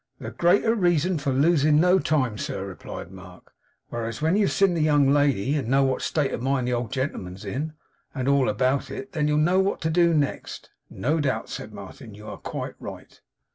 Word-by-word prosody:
'The -, -, -6 dB
greater 200 Hz, +6 st, +3 dB
reason 175 Hz, -4 st, +1 dB
for 140 Hz, -1 st, -1 dB
losing 150 Hz, +2 st, +3 dB
no 180 Hz, +3 st, +4 dB
time, 130 Hz, -10 st, 0 dB
sir,' 95 Hz, -2 st, -4 dB
replied 95 Hz, -2 st, -8 dB
Mark. 90 Hz, -2 st, -14 dB, 0.4 s
'Whereas, 115 Hz, 0 st, -4 dB
when 160 Hz, +4 st, +2 dB
you've 205 Hz, -2 st, +2 dB
seen 195 Hz, -2 st, +3 dB
the 165 Hz, -, 0 dB
young 145 Hz, -2 st, +4 dB
lady; 140 Hz, -4 st, +2 dB
and 140 Hz, -6 st, -1 dB
know 135 Hz, +3 st, +3 dB
what 130 Hz, -1 st, 0 dB
state 145 Hz, -4 st, 0 dB
of -, -, -3 dB
mind 130 Hz, -1 st, 0 dB
the 125 Hz, -, 0 dB
old 120 Hz, 0 st, -2 dB
gentleman's 105 Hz, -8 st, -4 dB
in, 145 Hz, +10 st, -3 dB, 0.4 s
and 130 Hz, -2 st, -2 dB
all 140 Hz, -2 st, +3 dB
about 130 Hz, +5 st, 0 dB
it; 135 Hz, 0 st, -7 dB
then 150 Hz, -1 st, 0 dB
you'll 150 Hz, 0 st, +2 dB
know 175 Hz, +5 st, +3 dB
what 190 Hz, +1 st, +1 dB
to 160 Hz, -, 0 dB
do 170 Hz, +1 st, +4 dB
next.' 145 Hz, -2 st, -3 dB, 0.2 s
'No 160 Hz, +2 st, -1 dB
doubt,' 140 Hz, -3 st, -1 dB
said -, -, -7 dB
Martin. 105 Hz, -, -11 dB
'You 105 Hz, +1 st, -12 dB
are -, -, -7 dB
quite -, -, -5 dB
right. -, -, -10 dB
140 Hz, 205 wpm, -25 LUFS, 125-160 Hz, 0.4 s, no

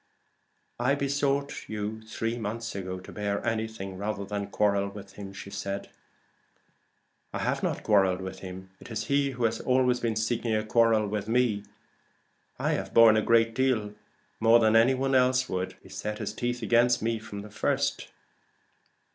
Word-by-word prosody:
"I 130 Hz, +3 st, +2 dB
besought 140 Hz, 0 st, -1 dB
you 110 Hz, +1 st, -4 dB
three 115 Hz, +1 st, -3 dB
months 115 Hz, 0 st, -4 dB
ago 95 Hz, -1 st, -5 dB
to 90 Hz, -, -11 dB
bear 100 Hz, -1 st, -2 dB
anything 110 Hz, -4 st, -3 dB
rather 100 Hz, -1 st, -3 dB
than 100 Hz, 0 st, -3 dB
quarrel 100 Hz, -1 st, +1 dB
with 100 Hz, 0 st, -11 dB
him." 100 Hz, -1 st, -8 dB, 2.0 s
"I -, -, -3 dB
have -, -, -1 dB
not -, -, -2 dB
quarrelled 95 Hz, -3 st, +3 dB
with 95 Hz, 0 st, -6 dB
him. 95 Hz, 0 st, -9 dB
It -, -, -12 dB
is 110 Hz, -2 st, -3 dB
he 140 Hz, +4 st, +1 dB
who 125 Hz, -, -2 dB
has 115 Hz, -1 st, +1 dB
been -, -, -10 dB
always 125 Hz, -4 st, +2 dB
seeking 115 Hz, -1 st, 0 dB
a 110 Hz, 0 st, -1 dB
quarrel 110 Hz, -1 st, +3 dB
with 105 Hz, 0 st, -3 dB
me. 115 Hz, -3 st, +1 dB, 0.9 s
I -, -, 0 dB
have -, -, -3 dB
borne 115 Hz, -1 st, +8 dB
a 110 Hz, -, +3 dB
great 115 Hz, 0 st, +3 dB
deal 115 Hz, -5 st, +1 dB, 0.5 s
more 115 Hz, +1 st, +6 dB
than 110 Hz, -1 st, +3 dB
any 120 Hz, +4 st, +5 dB
one 135 Hz, +1 st, 0 dB
else 130 Hz, 0 st, +3 dB
would. 90 Hz, -3 st, -3 dB
He -, -, -15 dB
set 105 Hz, 0 st, -4 dB
his 105 Hz, -, -4 dB
teeth 120 Hz, +1 st, -3 dB
against 120 Hz, +1 st, +3 dB
me 115 Hz, 0 st, 0 dB
from 100 Hz, -2 st, -8 dB
the 105 Hz, -, -11 dB
first." 105 Hz, -, 0 dB
110 Hz, 165 wpm, -28 LUFS, 105-120 Hz, 2.0 s, borne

